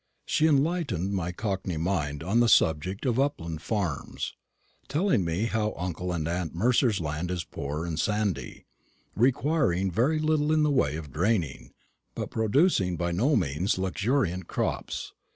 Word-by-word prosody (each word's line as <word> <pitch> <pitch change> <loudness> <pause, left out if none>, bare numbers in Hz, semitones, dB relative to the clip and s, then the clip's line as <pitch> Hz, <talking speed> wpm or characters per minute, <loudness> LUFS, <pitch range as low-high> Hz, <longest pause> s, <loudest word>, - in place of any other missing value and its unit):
She 155 - +2
enlightened 140 - +1
my 90 -3 -1
cockney 95 -3 -3
mind 80 -3 -1
on 100 +7 +2
the 120 -1 +4
subject 90 - +2
of 125 -1 +1
upland 85 - -1
farms, 95 -10 -3 0.5
telling 155 - +2
me 85 +6 -1
how 110 -2 -1
uncle 90 0 -3
and 80 -3 -2
aunt 85 -1 -2
Mercer's 115 +2 +3
land 80 +2 -3
is 90 -2 -2
poor 75 +2 -4
and 80 -2 -3
sandy, 100 - -1 0.5
requiring 125 - +2
very 125 - +2
little 155 -1 +1
in 155 -1 +3
the 150 - +3
way 75 - +2
of 75 -5 -7
draining, 80 - -1 0.4
but - - -4
producing 110 - +2
by 85 +1 -1
no 120 - +2
means 85 - 0
luxuriant 95 -1 0
crops. - - -3
95 Hz, 150 wpm, -27 LUFS, 85-125 Hz, 0.5 s, the